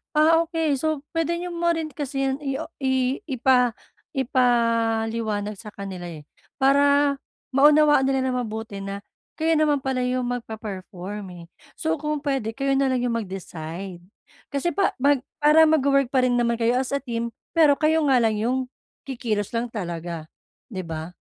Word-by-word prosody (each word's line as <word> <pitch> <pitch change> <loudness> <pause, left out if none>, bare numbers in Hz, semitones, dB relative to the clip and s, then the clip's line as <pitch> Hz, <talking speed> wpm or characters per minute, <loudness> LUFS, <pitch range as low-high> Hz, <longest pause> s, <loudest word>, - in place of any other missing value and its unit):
Ah, 315 +2 +5
okey. 320 -5 0
So, 310 -1 -1
puwede 330 0 0
niyo 355 +1 -5
mo 340 0 -1
rin 320 -1 -3
kasi 275 -2 -3
yan 270 +1 0
i 275 -2 -3
o 325 - -5
i 260 -1 +1
ipa 250 -3 +3 0.4
ipaliwanag 230 -4 +1
sa 220 - -11
kanila 190 -3 -6
eh, 155 -3 -9 0.3
para 280 +1 +3 0.3
maunawaan 295 0 +5
nila 265 -1 +1
nang 250 - -1
mabuti 220 -3 -5
na 195 +1 -6 0.3
kayo 320 0 +2
naman 295 -3 +2
pala 265 -1 -1
yung 255 0 0
magpe-perform 210 -4 -6 0.2
eh. - - -13 0.3
So, 320 -1 -1
kung 300 -1 -2
puwede 265 -6 -1
kayo 275 +1 0
nalang 260 -2 +1
yung 235 -2 0
mag-decide. 180 -2 -7 0.5
Kasi 280 +5 -1
pa 390 +6 +1
mag 285 -1 +4 0.2
para 315 +2 +7
magwo-work 275 -3 +3
pa 260 -1 +1
rin 245 -1 +2
naman 235 0 +2
kayo 235 +2 +2
as 265 +1 -1
a 280 - -3
team, 235 -3 -2 0.2
pero 310 -4 +5
kayo 315 +2 +2
nga 270 - +4
lang 220 -1 +1
yung 245 +4 +1 0.5
kikilos 225 -6 -3
lang 235 +1 -1
talaga, 170 -6 -5 0.4
'di 190 - -5
ba? 160 +1 -5
255 Hz, 165 wpm, -24 LUFS, 220-285 Hz, 0.5 s, para